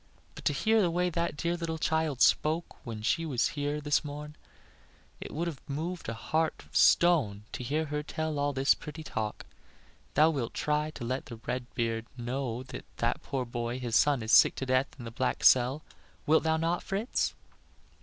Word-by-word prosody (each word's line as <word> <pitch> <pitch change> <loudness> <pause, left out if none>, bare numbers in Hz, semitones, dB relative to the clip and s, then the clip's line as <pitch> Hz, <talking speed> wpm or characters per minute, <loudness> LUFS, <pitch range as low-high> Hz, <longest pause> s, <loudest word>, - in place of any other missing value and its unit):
But - - -11
to - - +3
hear 220 +10 +3
the 180 - +3
way 180 +1 0
that 170 -2 -1
dear 170 +2 0
little 165 -2 -3
child 160 -4 +1
spoke 160 +3 +1
when 110 -3 -6
she 165 +8 +1
was 135 -7 +1
here 145 0 -2
this 150 +1 +1
morn 150 +1 -7 0.8
it - - -7
would 165 +3 -2
have 160 -6 -5
moved 165 +4 -4
a 115 - -3
heart 160 +7 -1
of - - -21
stone 135 -13 +4
to - - -5
hear 150 +6 0
her 150 0 -2
tell 160 +1 -3
of 150 - -3
all 145 0 +1
his 135 +1 +4
pretty 150 +1 -9
talk. 110 -8 -4 0.7
Thou 155 +2 +6
wilt 130 -7 -3
try 150 0 0
to 140 -6 -7
let 130 +3 -3
the 120 - -7
red 125 0 -3
beard 115 -1 -1
know 125 0 -3
that 130 - -9
that - - 0
poor 130 -2 -3
boy, 120 +1 -3
his 120 -3 -2
son, 140 -5 +4
is 110 - -2
sick - - +7
to 135 - -3
death 130 +1 +2
in 120 - -8
the 115 - -6
black 130 +3 -1
cell; 130 +4 +5 0.4
wilt 160 +2 +4
thou 160 0 +1
not, 165 +2 0
Fritz?" 205 +6 -1
145 Hz, 200 wpm, -30 LUFS, 125-160 Hz, 0.8 s, sick